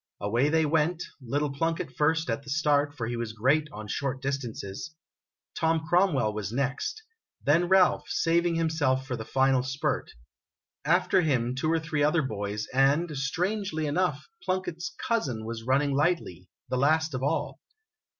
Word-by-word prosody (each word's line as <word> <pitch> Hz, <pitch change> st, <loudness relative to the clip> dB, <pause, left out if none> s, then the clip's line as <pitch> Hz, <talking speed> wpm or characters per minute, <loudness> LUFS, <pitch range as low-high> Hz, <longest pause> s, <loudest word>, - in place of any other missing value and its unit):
Away 115 Hz, +8 st, +1 dB
they 160 Hz, 0 st, +3 dB
went; 160 Hz, +3 st, +1 dB, 0.2 s
little 145 Hz, +4 st, -1 dB
Plunkett 165 Hz, -3 st, -2 dB
first, 160 Hz, +1 st, +2 dB
at 115 Hz, -, -2 dB
the 140 Hz, -, -12 dB
start, 145 Hz, 0 st, +1 dB
for 115 Hz, -, -2 dB
he 120 Hz, +1 st, -3 dB
was 115 Hz, -2 st, -4 dB
great 135 Hz, +8 st, +2 dB
on 105 Hz, 0 st, -8 dB
short 135 Hz, +4 st, -2 dB
distances; 135 Hz, -, -4 dB, 0.6 s
Tom 160 Hz, 0 st, +1 dB
Cromwell 175 Hz, -, +3 dB
was 105 Hz, -1 st, -4 dB
next; 140 Hz, -, -2 dB, 0.4 s
then 165 Hz, +5 st, +3 dB
Ralph, 190 Hz, -1 st, +4 dB
saving 170 Hz, 0 st, +2 dB
himself 155 Hz, -5 st, +1 dB
for 130 Hz, -2 st, -3 dB
the 110 Hz, -, -5 dB
final 135 Hz, 0 st, +3 dB
spurt; 130 Hz, +2 st, -2 dB, 0.7 s
after -, -, +3 dB
him, 125 Hz, -7 st, +1 dB
two 155 Hz, +5 st, 0 dB
or 165 Hz, -, +2 dB
three 160 Hz, -2 st, -2 dB
other 155 Hz, +2 st, +3 dB
boys, 105 Hz, -3 st, -3 dB
and, 145 Hz, +5 st, +3 dB
strangely 175 Hz, +4 st, -1 dB
enough, 150 Hz, -1 st, 0 dB, 0.2 s
Plunkett's 185 Hz, -2 st, -2 dB, 0.2 s
"cousin" 130 Hz, -, -1 dB
was 115 Hz, 0 st, -6 dB
running 140 Hz, +2 st, +2 dB
lightly, 140 Hz, -, 0 dB, 0.2 s
the 130 Hz, -, -1 dB
last 160 Hz, +3 st, +2 dB
of 130 Hz, -, -3 dB
all. 140 Hz, -, -1 dB
145 Hz, 155 wpm, -28 LUFS, 130-160 Hz, 0.7 s, Ralph